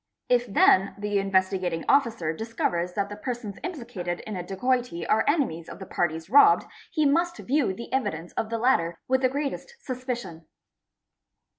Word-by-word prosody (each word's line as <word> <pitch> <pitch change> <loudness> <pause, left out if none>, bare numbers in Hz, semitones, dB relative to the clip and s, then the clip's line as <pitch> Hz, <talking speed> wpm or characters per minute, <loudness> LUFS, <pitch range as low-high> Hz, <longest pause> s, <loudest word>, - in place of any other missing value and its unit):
If 245 0 +3
then 195 -1 +4
the 205 0 0
Investigating 185 -3 0
Officer 230 - +2
discovers 180 -4 -2
that 200 0 -1
the. 205 - -6
persons 220 -2 -5
implicated 235 - -4
in 215 - -6
a 180 - -3
dacoity 195 0 -1
are 220 - +3
enemies 250 - 0
of - - -8
the 190 - -8
parties 160 -3 -2
robbed, 285 - +6 0.3
he 310 -3 +1
must 340 +4 +2
view 275 -5 +1
the 235 +7 -8
evidence 200 -10 -2
of 220 - -2
these 230 - -1
latter 170 -9 +2
with 260 0 +2
the 255 - +3
greatest 285 - -4
suspicion. 245 - -5
220 Hz, 160 wpm, -26 LUFS, 180-260 Hz, 0.3 s, robbed